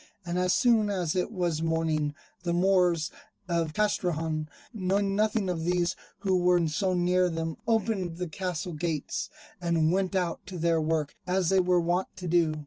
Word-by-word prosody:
And 175 Hz, +1 st, -1 dB
as 180 Hz, 0 st, +2 dB
soon 230 Hz, -5 st, +4 dB
as 180 Hz, -5 st, -1 dB
it 180 Hz, -, 0 dB
was 175 Hz, -6 st, -1 dB
morning, 160 Hz, -2 st, 0 dB, 0.3 s
the 175 Hz, -1 st, -1 dB
Moors 175 Hz, -3 st, +3 dB, 0.4 s
of 165 Hz, -3 st, -1 dB
Castrejon, 165 Hz, -7 st, 0 dB, 0.2 s
knowing 195 Hz, -1 st, 0 dB
nothing 215 Hz, -1 st, +1 dB
of 170 Hz, -3 st, -2 dB
these 175 Hz, 0 st, +1 dB, 0.3 s
who 190 Hz, -2 st, +2 dB
were 175 Hz, -2 st, +3 dB
so 185 Hz, +4 st, 0 dB
near 180 Hz, +1 st, +3 dB
them, 165 Hz, -1 st, -3 dB
opened 210 Hz, -7 st, 0 dB
the 180 Hz, 0 st, -3 dB
castle 180 Hz, 0 st, -4 dB
gates, 155 Hz, -2 st, -2 dB, 0.3 s
and 165 Hz, -2 st, +2 dB
went 190 Hz, +1 st, 0 dB
out 175 Hz, -3 st, -1 dB
to 185 Hz, -1 st, -6 dB
their 165 Hz, -1 st, +2 dB
work 155 Hz, -2 st, 0 dB
as 180 Hz, -1 st, +1 dB
they 190 Hz, 0 st, +4 dB
were 180 Hz, -1 st, +3 dB
wont 175 Hz, +2 st, 0 dB
to 180 Hz, -1 st, -6 dB
do. 165 Hz, -2 st, +3 dB
175 Hz, 170 wpm, -28 LUFS, 165-185 Hz, 0.4 s, soon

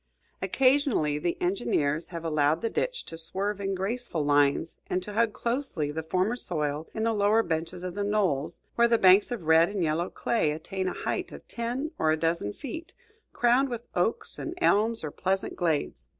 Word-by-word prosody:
Occasionally 255 Hz, -, +2 dB
the 170 Hz, +2 st, -1 dB
engineers 155 Hz, -3 st, 0 dB
have 170 Hz, -2 st, -7 dB
allowed 155 Hz, 0 st, +2 dB
the 230 Hz, -, 0 dB
ditch -, -, -2 dB
to 165 Hz, -, -6 dB
swerve 195 Hz, +5 st, -2 dB
in 195 Hz, 0 st, -1 dB
graceful 195 Hz, -4 st, -2 dB
lines 145 Hz, +2 st, +2 dB
and 180 Hz, -, -1 dB
to 210 Hz, -, -7 dB
hug 225 Hz, +1 st, +2 dB
closely 235 Hz, -, -2 dB
the 160 Hz, +2 st, -3 dB
firmer 185 Hz, +8 st, 0 dB
soil 155 Hz, -8 st, -2 dB
in 220 Hz, -, -1 dB
the 225 Hz, 0 st, +2 dB
lower 210 Hz, +2 st, +3 dB
benches 170 Hz, +1 st, -3 dB
of 180 Hz, -1 st, -4 dB
the 205 Hz, +2 st, -2 dB
knolls, 195 Hz, -9 st, 0 dB
where 235 Hz, 0 st, +4 dB
the 230 Hz, 0 st, +3 dB
banks 190 Hz, 0 st, +6 dB
of 240 Hz, -7 st, -4 dB
red 160 Hz, +1 st, +5 dB
and 200 Hz, -3 st, -2 dB
yellow 165 Hz, +3 st, 0 dB
clay 155 Hz, -10 st, 0 dB
attain 185 Hz, +4 st, -4 dB
a 185 Hz, -, -1 dB
height -, -, -2 dB
of -, -, -11 dB
ten 245 Hz, +6 st, -3 dB
or 155 Hz, -, +3 dB
a 155 Hz, -, +2 dB
dozen 165 Hz, -10 st, 0 dB
feet, 320 Hz, -, -8 dB, 0.4 s
crowned 245 Hz, +3 st, +3 dB
with 240 Hz, -1 st, -5 dB
oaks 180 Hz, +6 st, -1 dB
and 340 Hz, -, -5 dB
elms 225 Hz, -, +3 dB
or 150 Hz, -, -4 dB
pleasant 190 Hz, +4 st, -1 dB
glades. 150 Hz, -, -1 dB
185 Hz, 190 wpm, -28 LUFS, 160-230 Hz, 0.4 s, banks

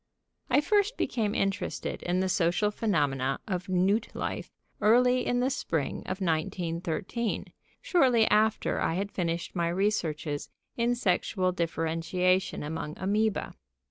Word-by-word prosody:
"] -, -, -53 dB
I 265 Hz, +3 st, +4 dB
first 415 Hz, +7 st, +2 dB
became 215 Hz, -3 st, -1 dB
interested 195 Hz, 0 st, -2 dB
in 180 Hz, +1 st, 0 dB
the 190 Hz, -, +1 dB
social 180 Hz, +3 st, +2 dB
phenomena 145 Hz, -, 0 dB
of 185 Hz, -1 st, -3 dB
newt 195 Hz, +5 st, +2 dB
life -, -, -3 dB, 0.3 s
early 250 Hz, +3 st, +4 dB
in 245 Hz, 0 st, +1 dB
the 260 Hz, +2 st, +1 dB
spring 160 Hz, -, -2 dB
of 185 Hz, +1 st, -3 dB
1913, 170 Hz, +5 st, -2 dB, 0.3 s
shortly 255 Hz, -10 st, +4 dB
after 215 Hz, +1 st, +2 dB
I 165 Hz, -, +1 dB
had 200 Hz, +2 st, -2 dB
finished 170 Hz, -1 st, -2 dB
my 170 Hz, -1 st, +1 dB
researches 170 Hz, -6 st, -1 dB, 0.3 s
in 240 Hz, +1 st, +1 dB
sexual 185 Hz, -3 st, +1 dB
differentiation 170 Hz, +2 st, 0 dB
among 155 Hz, 0 st, -4 dB
amœba. 210 Hz, +3 st, 0 dB
185 Hz, 130 wpm, -29 LUFS, 165-220 Hz, 0.3 s, I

